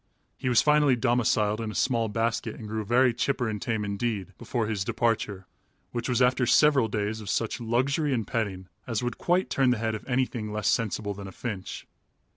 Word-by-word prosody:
He 130 - -2
was 120 -2 +4
finally 150 -3 +4
domiciled 115 -3 +1
in 110 - -3
a 105 - -7
small 115 -4 +1
basket 115 0 -1
and 110 - -8
grew 110 0 -3
very 120 +3 +3
chipper 125 0 0
and 105 -2 -3
tame 110 -2 -1
indeed 100 -1 -3
before 120 -3 -2
his 105 -3 -1
departure, 105 -4 -1 0.5
which 120 +1 -3
was 125 0 +3
after 125 0 +2
several 145 -5 +5
days 105 +1 -2
of 100 - -7
such 115 +2 -1
luxury 135 +6 +1
and 115 -5 0
petting 100 -6 -3 0.2
as 115 -1 -1
would 120 - -3
quite 180 +2 +1
turn 135 -2 +3
the 125 - +2
head 110 0 -1
of 110 - -5
anything 125 -4 -1
less 105 -1 0
sensible 105 -2 0
than 100 0 -8
a - - -8
finch. 95 -2 -6
115 Hz, 200 wpm, -27 LUFS, 105-125 Hz, 0.5 s, several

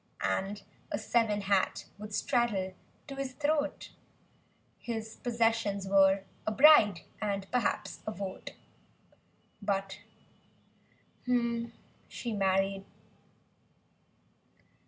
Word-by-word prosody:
And 195 - -1 0.3
a - - 0
seven 220 -3 +1
hat 195 -1 +1
would 210 0 -8
straddle 205 -4 0 0.3
to 275 - -8
his 270 -1 -3
throat. 295 +1 -1 0.9
His 225 -2 -5
possessions 225 -4 0
were—a 195 +1 +2
bride 215 - +7 0.2
and, 200 -2 -1
perhaps— 250 -4 -1
a - - 0
vote— 195 -2 -6 1.1
But 195 -1 -2 1.3
she 235 -1 -3
married. 195 0 +1
210 Hz, 80 wpm, -31 LUFS, 195-235 Hz, 1.3 s, bride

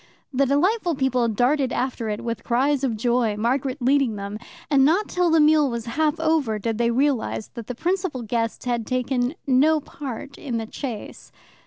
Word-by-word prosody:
The 275 +1 +2
delightful 350 - +2
people 255 -3 +1
darted 255 +5 +1
after 245 -3 -2
it 210 - -3
with 230 -1 -4
cries 270 +3 +1
of 235 -5 0
joy, 235 -2 +1
Margaret 255 +4 0
leading 260 -2 +2
them, 200 +1 -6 0.3
and 275 -2 +4
not 340 +9 +3
till 360 -1 +1
the 325 0 +4
meal 300 -1 +5
was 235 -2 -4
half 305 +6 0
over 315 -9 +1
did 225 +2 -3
they 235 0 +2
realize 255 -3 0
that 235 -3 -9
the 250 - -5
principal 350 -4 -1
guest 230 +1 -2
had 240 -3 -1
taken 255 +2 -1
no 290 +4 +4
part 280 -2 -8
in 250 -6 -3
the 225 - -3
chase. 230 -1 -7
255 Hz, 180 wpm, -23 LUFS, 235-290 Hz, 0.3 s, meal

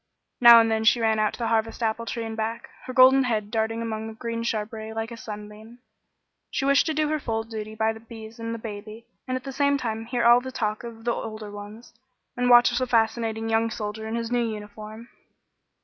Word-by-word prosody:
Now 235 -1 +10
and 225 0 +3
then 220 0 0
she 230 +2 +4
ran 220 -1 +2
out 215 0 +1
to - - -8
the 230 -2 -2
Harvest 225 +1 0
apple 230 +1 -1
tree 230 0 -3
and 225 0 -5
back, 220 +1 -4
her - - -5
golden 260 +1 +6
head 215 -4 -1
darting 225 0 -1
among 220 -1 -4
the 225 - -7
green 230 0 -4
shrubbery 220 -1 -3
like 225 +1 -4
a - - -6
sunbeam. 215 +1 -10 0.7
She 270 - -2
wished 280 +3 +4
to 315 - 0
do 305 0 +1
her 310 0 0
full 225 -4 -2
duty 220 -1 -7
by 220 0 +1
the 220 - -11
bees 225 0 -11
and 230 0 -4
the 230 - -3
baby, 220 +1 -8 0.2
and 255 0 -1
at 255 - -9
the 275 - -6
same 280 +1 +2
time 225 -3 -4
hear 240 -1 -1
all 240 +1 +7
the 260 +1 -7
talk 215 -3 -2
of 230 -1 -9
the 235 0 +1
older 215 -2 -6
ones, 205 +4 -10 0.4
and 245 0 +1
watch 245 0 +7
the 255 +1 0
fascinating 225 -1 0
young 225 0 +1
soldier 220 0 -5
in 220 - -3
his 230 0 -3
new 245 -1 +2
uniform. 215 +1 -7
225 Hz, 225 wpm, -25 LUFS, 220-235 Hz, 0.7 s, Now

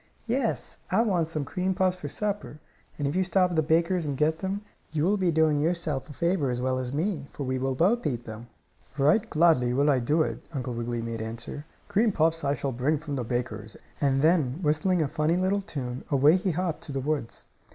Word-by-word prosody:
"Yes, 240 0 -1
I - - +3
want 180 -8 +1
some 155 -3 -3
cream 185 +5 -1
puffs 185 0 +2
for 150 - -6
supper, 205 -2 -3 0.4
and 145 - -1
if 145 - -2
you 190 - +3
stop 185 0 +2
at - - -2
the 160 - +4
baker's 170 +3 +2
and 140 -2 -2
get 155 +2 +1
them 195 +2 -2 0.3
you 150 -1 0
will 195 +5 +3
be 190 -3 +1
doing 160 -2 +3
yourself 160 -3 -1
a - - -8
favor 170 -3 +1
as 125 -1 -1
well 130 0 0
as 125 -1 -3
me, 155 -1 -2
for 145 - -5
we 130 0 -1
will 135 0 -1
both 190 - +2
eat 120 -4 -3
them." 110 +2 -8 0.5
"Right 155 +11 +3
gladly 155 -7 +3
will 145 +2 +4
I 135 - +3
do 150 +7 +2
it," - - -4
Uncle 130 -3 -3
Wiggily 120 0 -3
made 115 -1 -4
answer. 115 +7 -6 0.2
"Cream 220 +2 +2
puffs 165 -2 +1
I 140 0 +1
shall 135 +1 -2
bring 130 +6 +1
from 145 -1 -5
the 130 - -2
baker's," 110 -2 -4 0.2
and 135 -1 +2
then, 155 -5 +3
whistling 160 +3 +2
a - - 0
funny 155 +5 +1
little 190 +2 +1
tune, 130 -8 -5
away 145 +4 +5
he 185 +1 0
hopped 175 -1 -2
to - - -7
the 135 - -2
woods. 140 -3 -3
150 Hz, 225 wpm, -27 LUFS, 130-180 Hz, 0.5 s, away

